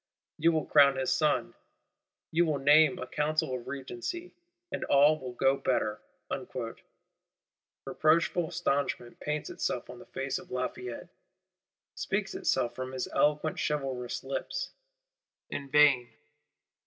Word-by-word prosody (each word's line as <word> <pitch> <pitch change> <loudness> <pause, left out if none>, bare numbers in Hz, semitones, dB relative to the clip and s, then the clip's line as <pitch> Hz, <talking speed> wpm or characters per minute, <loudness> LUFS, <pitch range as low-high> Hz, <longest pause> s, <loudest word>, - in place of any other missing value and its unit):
You 165 +2 +5
will 155 -2 0
crown 140 -2 +6
his 130 0 0
Son, 155 -2 +1 0.8
you 170 +2 +4
will 155 -4 +1
name 145 +1 +5
a 130 - -5
Council 155 +1 0
of 125 -2 -5
Regency; 140 - -5 0.4
and - - -3
all 145 +2 +5
will 125 -2 -6
go 135 +2 +3
better.' 105 -6 0 1.8
Reproachful 165 +2 +2
astonishment 135 -4 -1
paints 150 0 -3
itself - - -3
on - - -11
the - - -13
face - - -3
of - - -14
Lafayette; 125 -1 -4 0.8
speaks - - -2
itself 120 0 0
from 130 +1 -5
his 130 - -2
eloquent 150 +1 +1
chivalrous 135 -5 -2
lips: - - -3 0.8
in 140 -1 -5
vain. 140 -4 +5
140 Hz, 125 wpm, -30 LUFS, 130-155 Hz, 1.8 s, crown